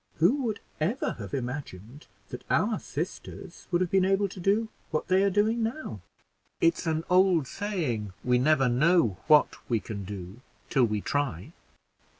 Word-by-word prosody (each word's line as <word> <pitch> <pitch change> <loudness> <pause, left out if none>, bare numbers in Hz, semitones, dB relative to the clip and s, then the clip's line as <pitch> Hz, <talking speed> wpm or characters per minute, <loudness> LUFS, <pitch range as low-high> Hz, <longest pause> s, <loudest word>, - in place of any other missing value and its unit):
Who 205 - +3
would 220 -3 -2 0.2
ever 195 - 0
have - - -7
imagined 125 -2 -6 0.2
that - - -7
our - - +2
sisters - - -7
would 175 - +1
have 180 - 0
been 190 -1 +4
able 195 +1 +2
to 185 - -10
do 205 +5 +1 0.2
what 155 +3 -2
they 185 +1 +4
are 200 - +3
doing 215 +4 +1
now? 225 - -4 0.6
It's 165 0 +2
an 160 0 0
old 180 -4 +4
saying, 135 - -3
'We 125 0 +3
never 135 0 +3
know 125 - +3
what 150 -1 +5
we 115 -2 +2
can 100 0 -6
do 95 +3 -8 0.3
till 130 -3 +4
we 105 -2 -1
try.' 135 - -2
155 Hz, 160 wpm, -28 LUFS, 120-195 Hz, 0.6 s, what